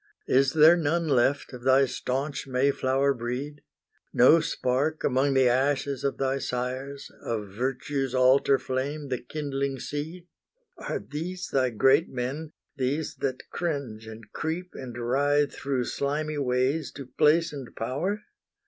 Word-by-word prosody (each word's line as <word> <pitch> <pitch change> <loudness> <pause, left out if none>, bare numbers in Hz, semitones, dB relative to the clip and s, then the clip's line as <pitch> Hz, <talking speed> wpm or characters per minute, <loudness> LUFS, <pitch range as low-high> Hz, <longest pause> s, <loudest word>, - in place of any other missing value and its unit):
Is 135 +1 +3
there 160 +2 +7
none 165 0 0
left 135 0 +2
of 125 - -8
thy 130 +2 +5
staunch 135 +3 -3
Mayflower 135 +1 +2
breed? 130 +4 -5 0.5
No 140 +7 +6
spark 145 +2 -1
among 135 +1 +2
the 130 -1 +5
ashes 135 +2 +1
of 140 - -1
thy 135 0 0
sires, 130 +3 -4
Of 105 -3 -3
Virtue's 130 +4 -2
altar 130 +2 +5
flame 140 +3 -3
the 125 -2 -1
kindling 140 0 -3
seed? 160 +6 -5 0.5
Are - - -3
these 175 +5 -5
thy 130 -2 +2
great 135 +7 +3
men, 135 +5 -4 0.2
these 140 +3 -1
that 130 -2 -3
cringe 140 -10 -3
and 110 +1 -9
creep, 170 +3 -3
And 125 -3 -8
writhe 140 +4 +1
through 135 -3 -1
slimy 150 +3 -2
ways 135 +3 0
to 140 - -8
place 155 +5 +3
and 135 -4 -8
power? 165 - -2
135 Hz, 140 wpm, -27 LUFS, 130-150 Hz, 0.5 s, there